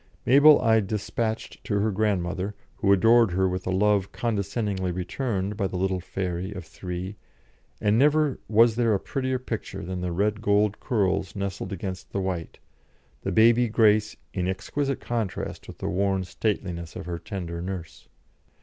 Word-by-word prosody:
Mabel 145 +4 +7
I 110 -2 +4
despatched 110 +2 -3
to 100 - 0
her 110 +2 +1
grandmother, 95 -1 -1 0.2
who 100 - +2
adored 115 +1 +5
her 95 +1 +2
with 90 0 -3
a - - 0
love 100 0 +2
condescendingly 100 -4 -1
returned 95 +2 -2
by 100 -2 0
the 95 - -4
little 95 0 0
fairy 90 0 -3
of 95 -4 -7
three, 90 +4 -6 0.6
and 105 +2 +2
never 150 0 +3
was 115 +1 +4
there 115 -3 +3
a - - 0
prettier 130 +2 -2
picture 125 - -5
than 90 +1 -4
the 90 -1 -2
red 105 +4 0
gold 105 0 +2
curls 100 -5 0
nestled 100 -1 -4
against 95 0 -6
the 100 - 0
white, 95 -4 -3 0.6
the - - -2
baby 115 +2 +5
grace 110 -1 +3 0.2
in 90 -2 -1
exquisite 135 +9 -2
contrast 115 -6 -3
with - - -10
the - - -4
worn 95 0 +1
stateliness 90 -4 -3
of - - -6
her 85 -1 -4
tender 85 -5 -5
nurse. 90 -3 -7
100 Hz, 160 wpm, -26 LUFS, 95-110 Hz, 0.6 s, Mabel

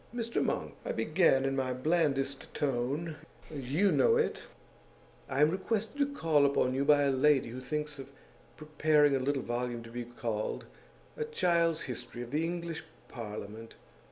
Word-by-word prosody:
"Mr 230 -1 -1
Monk," - - -2
I - - -2
began, 155 - +3
in 135 0 0
my 130 -1 0
blandest 140 -1 0
tone 145 +4 -1 0.3
you 150 +8 +1
know 470 -1 +4
it 460 - 0 0.9
"I 135 +1 0
am 150 +1 +5
requested 220 +7 -2
to 285 0 +2
call 160 - +2
upon 140 -2 +2
you 135 +1 +1
by 145 0 +5
a 140 - +3
lady 135 -1 +3
who 125 +2 -6
thinks 150 +2 -3
of 135 0 -8 0.5
preparing 150 -1 +3
a - - +1
little 135 0 0
volume 120 0 -3
to 115 - -11
be 120 0 -5
called 115 -3 -3 0.5
'A 460 - -1
Child's 170 - +1
History 120 -1 -6
of 120 - -10
the 155 +3 +1
English 170 -1 -3 0.3
Parliament. 110 -1 -7
145 Hz, 160 wpm, -31 LUFS, 130-165 Hz, 0.9 s, am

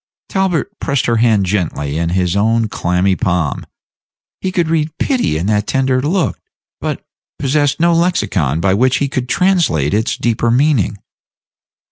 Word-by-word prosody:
Talbot 190 +1 -1
pressed 140 -2 0
her 115 -1 +1
hand 110 -4 +3
gently 80 -6 -2
in 85 0 0
his 90 0 0
own 115 +2 +2
clammy 90 0 0
palm. 85 -5 -1 0.7
He 190 - -2
could 175 -4 0
read 160 -1 -1
pity 250 - 0
in 85 - -2
that 105 0 0
tender 130 -1 +1
look, 170 +5 0 0.4
but - - -4 0.3
possessed 145 +1 0
no 170 +1 +3
lexicon 105 - +1
by 95 +2 +2
which 130 +5 +2
he 140 - 0
could 130 -2 -3
translate 170 - +1
its 110 +3 0
deeper 120 0 0
meaning. 125 - +2
120 Hz, 150 wpm, -16 LUFS, 95-155 Hz, 0.7 s, hand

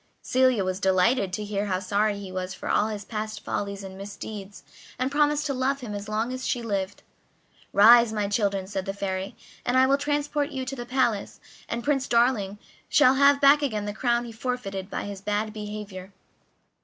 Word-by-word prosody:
Celia 255 -5 +3
was 185 0 -2
delighted 190 +2 +2
to 210 +3 -3
hear 205 0 -2
how 185 -2 0
sorry 205 +2 0
he 195 -2 -8
was 185 0 -4
for - - -8
all 210 - +2
his 210 -2 -5
past 215 -1 -5
follies 200 0 -3
and 190 -1 -8
misdeeds, 200 -1 -8 0.3
and 255 +2 -1
promised 295 0 +2
to 280 - -1
love 265 +2 0
him 225 -4 -6
as 205 +1 -6
long 220 +4 -1
as 255 0 -4
she 245 - -1
lived. 200 -3 -3 0.7
"Rise, 235 +2 +7
my 210 -2 -1
children," 200 -2 0
said 190 -1 -4
the 195 - -3
Fairy, 190 0 -3 0.3
"and 245 +1 +1
I 260 - +6
will 275 +1 +3
transport 290 0 -1
you 260 -1 -4
to 275 - -4
the 240 -2 -7
palace, 240 -6 0 0.3
and 235 0 -3
Prince 270 0 +1
Darling 235 -4 +2 0.3
shall 265 -3 +6
have 280 +1 +5
back 285 +1 +6
again 215 -7 -1
the 205 - -3
crown 240 +1 0
he 235 - -8
forfeited 225 -5 -4
by - - -3
his 200 -1 -7
bad 210 +1 -1
behavior." 210 -3 -7
215 Hz, 195 wpm, -26 LUFS, 200-255 Hz, 0.7 s, Rise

